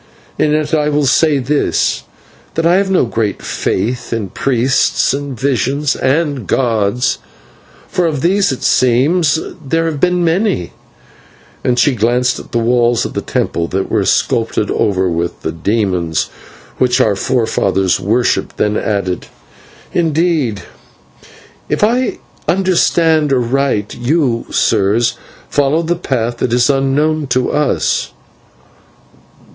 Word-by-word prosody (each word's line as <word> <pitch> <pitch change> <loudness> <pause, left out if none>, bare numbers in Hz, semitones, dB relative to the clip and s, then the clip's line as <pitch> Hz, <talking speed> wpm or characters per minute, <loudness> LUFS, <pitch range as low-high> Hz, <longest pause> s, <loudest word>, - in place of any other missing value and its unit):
And 150 - +2
yet 155 0 -1
I 150 -1 +2
will 145 -1 +1
say 150 +2 +3
this; 140 +3 0 0.5
that 165 - 0
I 175 +2 +4
have 195 0 +1
no 185 -8 +3
great 110 -4 -2
faith 120 +5 -2
in 110 -4 -2
priests 130 +3 +1
and 140 -3 -5
visions 135 +3 0
and 140 - 0
gods, 115 -1 0 0.7
for 175 -2 0
of 150 -4 -2
these 190 0 +2
it 130 - -5
seems 145 +7 +3 0.3
there 165 +4 0
have 155 -3 -2
been 180 +2 +2
many" 165 - 0 0.9
and 125 -1 +1
she 140 +3 +3
glanced 120 +2 +1
at - - -12
the - - 0
walls 120 0 +2
of - - -5
the - - -2
temple, 85 0 -2
that 95 +2 -3
were - - +2
sculptured - - 0
over 95 -2 +1
with 85 0 -3
the 80 - -2
demons 90 -2 -1 0.5
which 125 0 +2
our 110 -5 +3
forefathers 95 -6 0
worshipped, 110 +6 0
then 105 0 +1
added 100 -4 -2 0.7
"indeed, 160 - 0 1.1
if - - 0
I 245 +4 +1 0.3
understand 165 -4 +2
aright, 125 -4 0
you, 125 -2 0
sire, 105 0 +2 0.5
follow 145 +3 +1
a 175 +2 0
faith 120 -8 -2
that 120 - -1
is 120 +3 +3
unknown 145 +3 0
to 130 0 0
us." 150 0 0
130 Hz, 130 wpm, -15 LUFS, 115-155 Hz, 1.1 s, I